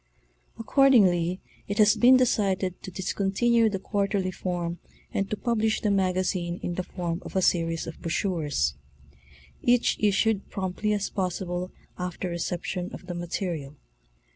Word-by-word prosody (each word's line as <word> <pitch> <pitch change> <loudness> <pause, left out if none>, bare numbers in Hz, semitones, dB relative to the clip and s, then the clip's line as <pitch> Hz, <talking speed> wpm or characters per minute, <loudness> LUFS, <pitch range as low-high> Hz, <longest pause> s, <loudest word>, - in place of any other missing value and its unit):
Accordingly 200 - +4 0.3
it 205 - -3
has 215 0 +6
been 245 +4 +7
decided 195 -7 +1
to - - -7
discontinue 200 +5 +1
the 200 - -2
quarterly 195 -1 -1
form 175 -1 -3 0.3
and 195 0 -1
to 215 - -2
publish 220 -2 +1
the 210 - +1
Magazine 185 -2 0
in 175 - -2
the 185 - -2
form 175 -1 -4
of - - -9
a 190 - +3
series 165 -2 +1
of 165 - -9
brochures, 160 - 0 0.9
each 245 0 +3
issued 210 0 +2
promptly 195 +2 -2
as 205 -1 -2
possible 180 -1 -2 0.3
after 180 0 -3
reception 175 +1 -3
of - - -12
the 180 - -5
material. 170 -4 -4
185 Hz, 140 wpm, -26 LUFS, 175-210 Hz, 0.9 s, been